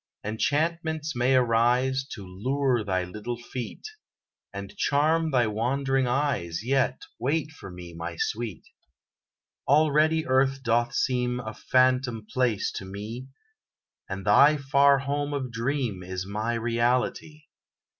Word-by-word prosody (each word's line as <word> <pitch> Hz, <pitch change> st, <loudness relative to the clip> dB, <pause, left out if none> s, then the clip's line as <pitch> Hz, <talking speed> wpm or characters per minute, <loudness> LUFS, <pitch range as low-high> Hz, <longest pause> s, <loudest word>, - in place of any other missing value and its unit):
Enchantments 155 Hz, +7 st, -1 dB
may 125 Hz, +2 st, +2 dB
arise 125 Hz, +2 st, +2 dB
To 100 Hz, -4 st, -8 dB
lure 125 Hz, +6 st, 0 dB
thy 95 Hz, -2 st, 0 dB
little 105 Hz, +6 st, -5 dB
feet, 120 Hz, -, -7 dB, 0.6 s
And 100 Hz, 0 st, -8 dB
charm 155 Hz, +3 st, +2 dB
thy 125 Hz, -4 st, +3 dB
wondering 130 Hz, +5 st, 0 dB
eyes; 120 Hz, -, -1 dB
Yet; 135 Hz, -, 0 dB, 0.2 s
wait 150 Hz, +3 st, -1 dB
for 150 Hz, -, -11 dB
me, 90 Hz, -1 st, -10 dB
my 85 Hz, +1 st, -6 dB
sweet! 110 Hz, -3 st, -3 dB, 1.0 s
Already 155 Hz, +2 st, +3 dB
Earth 135 Hz, +1 st, +2 dB
doth 120 Hz, +1 st, +1 dB
seem 125 Hz, -1 st, 0 dB
A 110 Hz, -3 st, -6 dB
phantom 125 Hz, -2 st, +1 dB
place 120 Hz, -3 st, 0 dB
to -, -, -5 dB
me, 105 Hz, +7 st, -7 dB, 0.8 s
And 95 Hz, 0 st, -5 dB
thy 140 Hz, +9 st, +6 dB
far 140 Hz, 0 st, +4 dB
home 145 Hz, +1 st, -2 dB
of 130 Hz, -3 st, -3 dB
dream, 115 Hz, -4 st, -2 dB
Is 90 Hz, 0 st, -5 dB
my 110 Hz, +4 st, -2 dB
reality. 120 Hz, +6 st, -1 dB
125 Hz, 125 wpm, -26 LUFS, 110-140 Hz, 1.0 s, thy